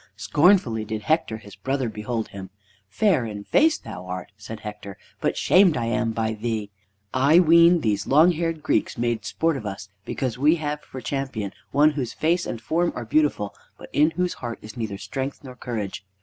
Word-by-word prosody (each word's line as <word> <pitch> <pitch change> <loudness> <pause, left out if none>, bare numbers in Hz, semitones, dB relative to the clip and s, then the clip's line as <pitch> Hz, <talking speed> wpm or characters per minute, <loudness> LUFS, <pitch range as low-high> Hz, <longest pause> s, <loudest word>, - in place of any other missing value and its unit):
Scornfully 145 - +3
did 110 0 -5
Hector 160 -8 +1
his 105 -2 -13
brother 135 +5 -2
behold 110 +1 -4
him. 95 -1 -8 0.4
"Fair 180 - +2
in 105 -3 -6
face 310 - +3
thou 90 0 -9
art!" 90 +1 -6
said 105 +1 -9
Hector, 105 -2 -8 0.2
"but - - -1
shamed 185 -5 +5
I 120 - -1
am 115 0 0
by 110 0 -1
thee! 110 -2 -3 0.4
I 140 +6 +5
ween 170 0 +6
these 105 -5 0
long 155 +6 +6
haired 165 -2 -2
Greeks - - 0
make 120 -2 -1
sport 165 -3 0
of 110 - -8
us 100 0 -7
because 125 0 -3
we 150 +4 +5
have 150 -2 -3
for 130 - -9
champion 130 -9 -3 0.2
one 150 +5 +4
whose 135 -5 -3
face 170 +2 0
and 115 - -4
form 170 +9 0
are 120 - -5
beautiful, 130 -6 +1 0.2
but - - -12
in 150 +2 +4
whose 180 -1 0
heart 120 -1 -4
is 105 0 -10
neither 110 -5 -4
strength 130 +10 -5
nor 130 -2 -10
courage. 110 -7 -5
120 Hz, 190 wpm, -24 LUFS, 105-155 Hz, 0.4 s, ween